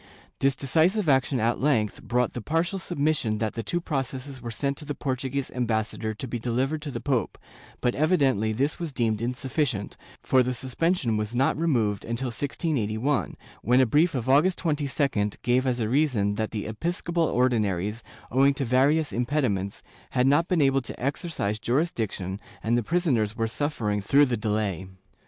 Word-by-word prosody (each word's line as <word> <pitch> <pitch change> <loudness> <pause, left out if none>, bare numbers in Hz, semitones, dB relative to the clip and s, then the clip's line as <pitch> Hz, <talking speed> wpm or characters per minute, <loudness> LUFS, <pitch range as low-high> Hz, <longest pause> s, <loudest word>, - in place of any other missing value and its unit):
This 135 0 +2
decisive 165 +8 +2
action 135 -1 +3
at 115 +2 +1
length 120 -7 +1
brought 125 0 0
the 120 - -5
partial 165 - -1
submission 145 -10 0
that 110 0 -2
two 175 - 0
processes 135 -4 -4
were 120 - -5
sent 140 +6 -2
to 150 - -7
the 145 - -4
Portuguese 135 0 -2
ambassador 110 -2 -1
to 130 - -6
be 120 0 -3
delivered 130 +6 -1
to 150 - -5
the 120 -4 -4
pope, 125 -4 -1 0.4
but 125 - +2
evidently 135 - +2
this 135 +10 -1
was 170 -3 -4
deemed 115 -5 0
insufficient, 125 -2 -2 0.3
for 130 - +4
the 125 0 -1
suspension 130 -1 0
was 105 +2 -3
not 130 +3 +2
removed 120 -11 +1
until 120 +3 -3
1681, 130 -1 -1 0.2
when 125 +4 +3
a 130 - +6
brief 150 +7 +3
of 125 -2 -2
August 150 +8 +4
2^d 140 - 0
gave 125 +2 +2
as 125 -1 0
a 110 - 0
reason 120 -6 +2
that 110 +1 -2
the 105 -3 -4
episcopal 170 +8 -1
Ordinaries, 110 - 0 0.3
owing 135 +3 +4
to 135 - -2
various 140 +5 +2
impediments, 120 -7 -1 0.3
had 125 - +4
not 145 +5 +4
been 170 -5 +2
able 135 0 +3
to 120 - -8
exercise 135 - -2
jurisdiction 110 - -1 0.2
and 115 +2 +2
the 120 - +2
prisoners 125 - +1
were 115 - +1
suffering 110 -5 -1
through 140 +9 +5
the 125 -3 0
delay. 105 -4 -2
130 Hz, 170 wpm, -26 LUFS, 110-145 Hz, 0.4 s, a